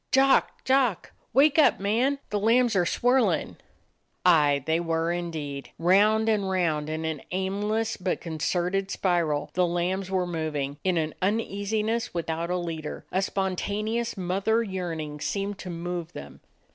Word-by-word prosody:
"Jock! 270 +1 +3
Jock! 260 -7 +1 0.2
Wake 280 +4 +4
up, 305 - +5
man! 235 +8 +1
The 205 - 0
lambs 230 +2 +3
are 175 -2 +3
swirlin'!" 250 +6 +1 0.7
Aye, 145 -5 +4
they 160 +1 +1
were 165 0 0
indeed. 155 -5 -4
Round 210 +6 +4
and 205 -3 +1
round 160 -5 0
in 160 +1 -3
an 160 -3 -3
aimless 205 +4 -1
but 185 -1 -2
concerted 180 +4 -1
spiral, 170 -6 0
the 180 0 +2
lambs 180 +2 -1
were 185 -1 0
moving; 155 -5 -3
it 185 - +2
was 165 - +2
an 155 - -5
uneasiness 215 +2 -1
without 165 0 -2
a 180 - 0
leader; 165 -3 -5
a 190 - +1
spontaneous 205 +5 -2
mother 195 +5 +1
yearning 165 -7 -4
seemed 200 +4 -3
to 185 - -7
move 175 0 -5
them. 70 0 -10
185 Hz, 145 wpm, -26 LUFS, 165-210 Hz, 0.7 s, up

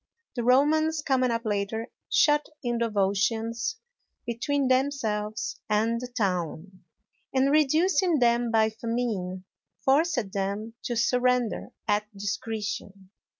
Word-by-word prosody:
The 240 - -2
Romans, 305 +5 +3
coming 255 -3 +2
up 230 0 -2
later, 210 +2 -2 0.2
shut 295 0 +3
in 240 -1 -1
the 235 0 +1
Volscians 220 - 0 0.5
between 260 +4 0
themselves 230 -5 -1
and 225 +3 +1
the 250 - -4
town, 185 -4 -3 0.5
and, 265 +1 +3
reducing 320 +4 +3
them 240 -1 +3
by 220 -1 +3
famine, 220 -5 -3 0.4
forced 305 +4 +3 0.2
them 200 +3 -3
to 240 - -1
surrender 250 0 +1 0.2
at 210 +1 +1
discretion. 200 -2 -4
230 Hz, 110 wpm, -27 LUFS, 210-260 Hz, 0.5 s, Romans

